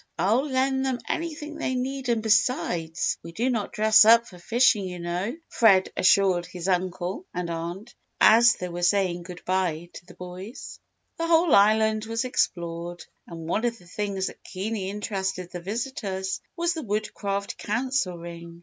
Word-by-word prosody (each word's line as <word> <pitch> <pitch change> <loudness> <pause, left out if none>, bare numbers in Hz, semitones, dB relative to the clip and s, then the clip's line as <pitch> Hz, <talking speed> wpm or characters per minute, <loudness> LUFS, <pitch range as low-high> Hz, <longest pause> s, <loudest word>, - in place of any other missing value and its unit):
"I'll 225 - +2
lend 265 0 +1
them 260 -2 0
anything 310 -2 -4
they 260 - -1
need 260 +1 -3
and 230 -2 +1
besides, 190 -7 +1
we 165 - -9
do 240 +7 0
not 220 -4 -2
dress 215 0 +6
up 230 +2 +6
for 180 -5 -13
fishing 225 +1 +3
you 180 -1 -6
know," 175 - -3
Fred 195 -6 +4
assured 185 -2 +3
his 180 0 -6
uncle 185 - -2
and 175 -1 -3
aunt, 170 +7 -6 0.3
as 230 +1 +7
they 180 - -5
were 175 0 -5
saying 175 -1 +2
good 180 0 -10
bye 175 -2 -1
to - - -11
the - - -14
boys. 180 +6 -9 0.4
The 330 - -1
whole 330 -1 +4
island 215 +1 +4
was 230 +2 -2
explored 175 -7 -2 0.2
and 165 -2 -8
one 210 +6 0
of 235 -1 0
the 180 - -19
things 195 +1 -3
that - - -7
keenly 195 0 -4
interested 190 -3 -3
the 180 - -6
visitors 195 -2 -3
was 340 0 0
the 325 - -4
Woodcraft 200 -3 -3
Council 240 -4 -1
Ring. 170 0 -9
200 Hz, 165 wpm, -25 LUFS, 180-235 Hz, 0.4 s, as